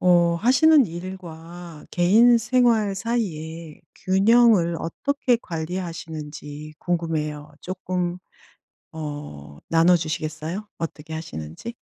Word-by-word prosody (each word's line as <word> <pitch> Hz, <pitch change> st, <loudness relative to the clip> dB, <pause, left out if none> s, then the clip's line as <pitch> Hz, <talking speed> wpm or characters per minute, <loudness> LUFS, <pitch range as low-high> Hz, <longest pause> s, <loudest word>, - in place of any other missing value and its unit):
어 175 Hz, -1 st, +4 dB
하시는 265 Hz, -, +5 dB
일과 175 Hz, -2 st, -9 dB
개인 220 Hz, +8 st, +5 dB
생활 230 Hz, -3 st, +2 dB
사이에 170 Hz, -7 st, -4 dB
균형을 195 Hz, -2 st, +4 dB
어떻게 255 Hz, -, 0 dB
관리하시는지 160 Hz, -4 st, -6 dB
궁금해요. 155 Hz, -4 st, -2 dB
쪼끔 180 Hz, -1 st, -3 dB, 0.7 s
어 145 Hz, -, -7 dB
나눠 165 Hz, +2 st, +5 dB
주시겠어요, 155 Hz, +4 st, -4 dB
어떻게 160 Hz, -1 st, -6 dB
하시는지? 160 Hz, -, -7 dB
170 Hz, 230 characters per minute, -23 LUFS, 155-195 Hz, 0.7 s, 하시는